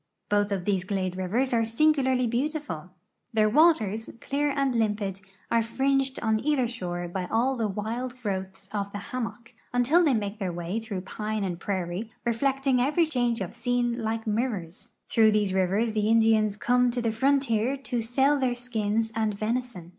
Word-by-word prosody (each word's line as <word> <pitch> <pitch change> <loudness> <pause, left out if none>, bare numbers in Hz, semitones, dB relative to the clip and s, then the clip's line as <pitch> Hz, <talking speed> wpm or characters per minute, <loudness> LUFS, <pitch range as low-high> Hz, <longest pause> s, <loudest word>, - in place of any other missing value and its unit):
Both 205 0 +2
of 190 -3 -2
these 195 -3 +1
glade 185 -2 -2
rivers 220 +8 0
are 230 -1 +3
singularly 260 +1 +2
beautiful. 240 - -2 0.4
Their 215 -1 +4
waters, 225 - +3
clear 290 +4 0
and 275 -2 0
limpid, 210 -4 -1 0.3
are 230 - +4
fringed 270 +3 0
on 220 -1 +2
either 280 -4 +2
shore 175 -6 -4
by 180 +1 -4
all 250 +4 +2
the 225 -3 0
wild 230 +5 -4
growths 190 -2 -4
of 200 -1 -2
the - - -3 0.2
hammock, 230 -2 -5 0.2
until 250 +9 +4
they 290 -6 +3
make 205 0 -3
their 190 -3 -2
way 175 +5 -3
through 215 -5 -5
pine 215 +2 -3
and 175 -3 -3
prairie, 190 +3 -3
reflecting 265 +2 +1
every 300 +6 +3
change 245 -7 0
of 185 - -4
scene 245 -1 0
like 225 0 -2
mirrors. 210 -3 -2 0.2
Through 220 -1 +4
these 205 -3 +1
rivers 195 +5 +1
the 215 -1 0
Indians 220 -2 +3
come 245 +2 +3
to 245 +1 -2
the 225 - +1
frontier 265 0 +1
to 250 -3 -2
sell 270 +5 +2
their 255 -2 +1
skins 225 -2 -1
and 220 -2 0
venison. 215 -4 -3
225 Hz, 170 wpm, -27 LUFS, 205-250 Hz, 0.4 s, Their